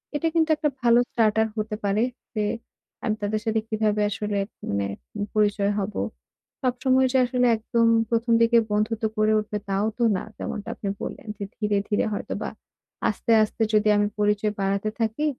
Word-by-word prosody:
এটা 295 +3 +1
কিন্তু 320 -1 +3
একটা 300 0 0
ভালো 240 0 +5
starter 220 -1 +3
হতে 215 0 -2
পারে। 200 +2 +2 0.3
যে 215 - +1 0.6
আমি 215 - 0
তাদের 210 +1 0
সাথে 220 0 +1
কিভাবে 215 -1 +1
আসলে 205 0 -2 0.3
মানে 100 0 0 0.3
উম 205 - -2
পরিচয় 205 -1 +2
হব। 200 +1 -3 0.7
সবসময় 260 0 +2
যে 265 - +3
আসলে 250 0 +1
একদম 230 +1 +1 0.2
১ম 230 0 +1
দিকে 230 0 +5
বন্ধুত্ব 215 +2 0
গড়ে 215 0 +3
উঠবে 210 0 -3
তাও 195 +1 +1
তো 240 - +1
না। - - -4
যেমনটা 210 - -5
আপনি 200 - -6
বললেন - - -6
যে 200 - -5
ধীরে, 210 -2 0
ধীরে 205 - +2
হয়তোবা - - -4 0.6
আস্তে, 230 - -2
আস্তে 215 - -5
যদি 215 0 +4
আমি 205 0 +3
পরিচয় 210 0 +1
বাড়াতে 195 +2 0
থাকি, 225 +6 0
215 Hz, 170 wpm, -25 LUFS, 210-230 Hz, 0.7 s, ভালো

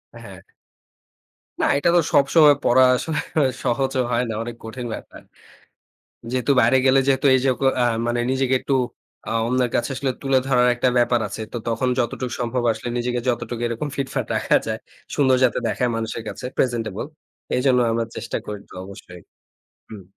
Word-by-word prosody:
হ্যাঁ। - - -11 1.2
না - - +3
এটা 170 +4 +2
তো - - +6
সবসময় 145 +1 +6
পড়া 130 +2 +5
আসলে 155 +4 -2 0.4
সহজও 130 +1 0
হয় 120 +1 +1
না। - - -2
অনেক 120 0 -7
কঠিন 120 +2 -6
ব্যাপার। - - -12 1.1
যেহেতু 130 +2 +1
বাইরে 120 +3 +4
গেলে 135 +1 +5
যেহেতু 135 0 +2
এই - - +5
যে 135 - +4 0.3
অ্যা 120 - +3 0.2
মানে 120 0 0
নিজেকে 130 0 +1
একটু 140 - -1 0.5
অ্যা - - -4
অন্যের 125 0 +1
কাছে 120 +3 0
আসলে 135 0 -1
তুলে 135 -1 +3
ধরার 125 -2 +3
একটা 125 +1 +1
ব্যাপার 120 -1 +2
আছে। - - -7
তো - - -4
তখন 115 +2 0
যতটুকু 120 +1 -2
সম্ভব 120 +1 -1
আসলে 120 - -6
নিজেকে 120 0 -1
যতটুকু 120 -1 -2
এরকম 115 +6 -3
ফিটফাট 135 -1 -2
রাখা - - +2
যায় - - -2 0.4
সুন্দর 130 -3 +4
যাতে 120 - +2
দেখায় 125 -1 0
মানুষের 115 0 -4
কাছে - - -8
প্রেজেন্টেবল। 115 -5 -1 0.5
এইজন্য 125 0 +3
আমরা 115 0 0
চেষ্টা 115 - -4
করি 105 -1 -5
একটু - - -17
অবশ্যই। 90 -2 -12 0.7
হুম। 105 -3 -10
125 Hz, 165 wpm, -22 LUFS, 115-130 Hz, 1.2 s, তো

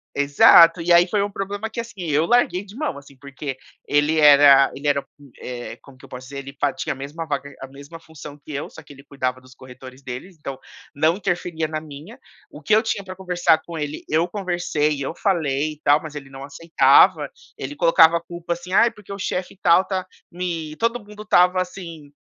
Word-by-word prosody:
Exato! 165 +4 +6
E, 170 +1 -1
aí, 170 +1 +6
foi 205 +2 0
um 200 - -1
problema 200 +2 -5
que, 220 - -7
assim, 230 -4 -7
eu 150 +2 +2
larguei 205 -3 +2
de 200 +1 -14
mão, 300 - -3
assim, 140 0 -15
porque 140 0 -7 0.3
ele 145 +2 +1
era 140 -2 +7
ele 140 +2 -5
era, 140 -1 +2 0.2
hum, 140 -2 -17
eh, 120 -1 -7
como 140 -2 -17
que 130 - -22
eu - - -18
posso 125 +1 -10
dizer? 140 +1 -7
Ele 140 0 -10
fa 145 - +1
tinha - - -4
a - - -13
mesma 145 +5 -7
vaga 140 -1 -4
a 130 - -7
mesma 140 +5 -12
função 155 -3 -12
que 150 +1 -13
eu, 140 +1 -5
só - - -12
que - - -17
ele 140 0 -16
cuidava 130 -2 -4
dos 130 0 -18
corretores 130 +1 -13
deles, 130 +8 -8
então 135 -3 -7 0.4
não 155 +4 +2
interferia 175 -4 -2
na 155 0 -4
minha. 155 - -12 0.3
O - - -12
que 160 - 0
eu 220 - +4
tinha 220 -3 -3
pra 185 -1 -9
conversar 180 -3 +1
com 170 -1 -8
ele, 150 -1 -5
eu 160 +3 +1
conversei 175 -6 -1
e - - -7
eu 135 - -4
falei 155 -6 -1
e 150 - -19
tal, 145 +1 +4
mas 155 -2 -10
ele 140 -2 -8
não 135 0 -10
aceitava. 160 +4 +3 0.3
Ele 290 - -6
colocava 165 - +5
a - - -7
culpa, 170 0 -5
assim: 175 +2 -9
"Ai, 235 +4 +5
porque 205 -1 -11
o 200 - -8
chefe 185 0 -4
tal 180 +1 +4
tá 185 -2 -3 0.3
me", 170 -3 -5
todo 230 +1 0
mundo 210 0 -12
estava 185 -3 +3
assim, 170 -5 -9
160 Hz, 225 wpm, -21 LUFS, 140-180 Hz, 0.4 s, era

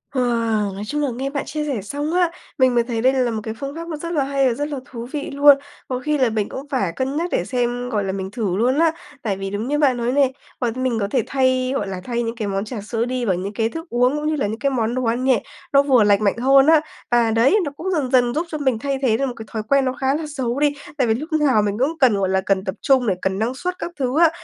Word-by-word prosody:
Wow! 230 -5 +1
Nói 195 +2 -6
chung 295 +7 -2
là 290 - +1
nghe 270 +3 -3
bạn 280 0 -3
chia 300 +1 -3
sẻ 270 -8 -2
xong 290 - -3
á, 355 -2 +2 0.3
mình 255 -2 +3
mới 235 - +4
thấy 230 -2 -3
đây 260 +2 +4
là 255 -3 +1
một 220 -1 -3
cái 220 - -4
phương 275 +5 -6
pháp 335 +1 -6
nó 320 -2 -4
rất 335 +3 -5
là 295 -4 +2
hay 275 0 +1
và 245 - +2
rất 290 +5 -3
là 285 -3 -4
thú 235 -2 -7
vị 295 -2 -4
luôn. 285 0 +6 0.3
Có 255 -1 -2
khi 300 +3 0
là 260 -4 +3
mình 215 -2 -1
cũng 270 +2 -7
phải 200 - 0
cân 265 +2 -2
nhắc 345 +2 -1
để - - 0
xem, 245 -1 -1
gọi 210 -4 0
là, 195 - -2
mình 190 0 -4
thử 205 -6 -2
luôn 255 +6 +2
á. 330 -1 +4 0.3
Tại 200 -4 -2
vì 195 0 -4
đúng 205 +4 -3
như 295 +2 0
bạn 270 -4 +3
nói 235 +1 0
này, 270 -1 +3 0.3
mọi 240 -2 +1
mình 255 -1 -1
có 200 - 0
thể 250 -4 +2
thay, 260 -1 +1
gọi 205 - -1
là, 190 -1 -5
thay 240 -1 -2
những 230 0 -3
cái 220 -3 -3
món 195 +1 -2
trà 220 -1 -6
sữa 225 +2 -2
đi 250 0 -2
vào 190 -4 +2
những 190 +3 -4
cái 225 +2 0
thức 325 +5 -8
uống 250 +3 +2
cũng 300 0 -2
như 310 - +1
là 270 -8 0
những 220 +2 -4
cái 280 - +1
món 240 -3 -1
đồ 255 - -1
ăn 235 +2 0
nhẹ, 260 -5 +2 0.3
nó 275 - +7
vừa 260 -5 +4
lành 205 0 +3
mạnh 205 +1 +2
hơn 270 +2 +5
á. 320 -1 +6 0.3
Và 235 -2 +3
đấy, 230 - +4
nó 285 - -3
cũng 380 +3 -3
dần 290 -8 -1
dần 245 -2 +3
giúp 320 +5 -1
cho 310 - -3
mình 260 -6 0
thay 275 +2 -1
thế 230 -5 +2
được 275 - 0
một 255 - -3
cái 220 - -8
thói 220 -1 -3
quen 275 -1 +4
nó 255 - 0
khá 265 +1 0
là 315 +1 -3
xấu 255 -1 -1
đi 295 0 +3 0.2
tại 255 -4 +2
vì 220 - +3
lúc 295 +8 -5
nào 290 -8 +3
mình 205 0 -1
cũng 300 +6 0
cần, 255 -5 +5
gọi 195 -1 0
là, 190 0 +2
cần 190 0 0
tập 190 -1 -4
trung 260 -3 +3
để 195 - +2
cần 190 0 -1
năng 235 +4 -1
suất 360 +6 -4
các 345 - -4
thứ 260 +3 0
á. 335 -1 +7
255 Hz, 310 wpm, -21 LUFS, 225-280 Hz, 0.3 s, nó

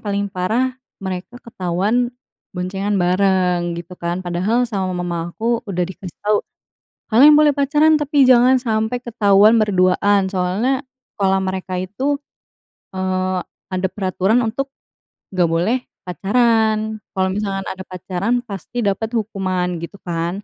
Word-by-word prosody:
paling 200 -1 -1
parah, 225 +8 0 0.2
mereka 190 +4 -6
ketahuan 205 +4 0 0.5
boncengan 195 +3 -2
bareng, 180 -2 +1
gitu 175 +1 -8
kan. 175 +2 -3
Padahal, 190 +8 +1
sama 195 -5 -2
mama 175 -1 -3
aku 230 +6 -1
udah 180 -2 0
dikasih 185 -1 -9
tahu, 210 0 +3 0.7
"Kalian 280 +7 +8
boleh 300 0 +6
pacaran, 295 +2 +3
tapi 290 -1 +2
jangan 255 0 +5
sampai 220 +1 -1
ketahuan 215 -1 +4
berduaan." 195 -1 +2
Soalnya, 210 +9 0 0.3
sekolah 190 -1 +2
mereka 185 -1 -3
itu, 255 +10 -1 0.8
eee, 185 -1 -1 0.3
ada 185 0 0
peraturan 195 +4 0
untuk 270 +5 -3 0.6
nggak 180 -2 +2
boleh 175 +10 +1 0.2
pacaran. 220 +2 +1 0.2
Kalau 190 0 +1
misalkan 195 -1 -2
ada 190 0 -7
pacaran, 185 +4 -3
pasti 220 +3 -5
dapat 220 +4 -1
hukuman, 185 -5 -1
gitu 170 +4 -8
kan. 175 +3 -3
195 Hz, 125 wpm, -19 LUFS, 185-230 Hz, 0.8 s, Kalian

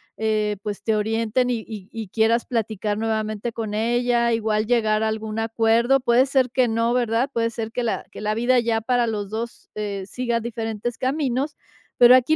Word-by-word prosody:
eh, 215 -1 0
pues 210 -2 -5
te 220 - +1
orienten 225 +3 0
y 240 - 0
y 205 -4 -8
y 225 -2 -6
quieras 225 +4 +2
platicar 215 -3 -2
nuevamente 220 0 -2
con 220 -2 -4
ella, 235 +1 +1
igual 220 -1 +1
llegar 220 -2 +2
a 220 - +2
algún 220 0 -4
acuerdo, 225 +3 +3
puede 245 0 +4
ser 260 -2 +2
que 250 -1 +2
no, 230 +1 +1
¿verdad?, 240 +1 +1
puede 230 0 +1
ser 225 0 -5
que 245 - -1
la 230 - -2
que - - -10
la 215 0 0
vida 240 +3 +3
ya 230 -1 +1
para 245 +1 +1
los 210 -3 -3
2 230 +3 -6
eh, 200 -2 -3
siga 240 +1 -1
diferentes 230 0 -4
caminos, 270 +1 -1 0.4
pero 245 +1 +8
aquí 255 +5 +4
225 Hz, 190 wpm, -23 LUFS, 215-240 Hz, 0.4 s, pero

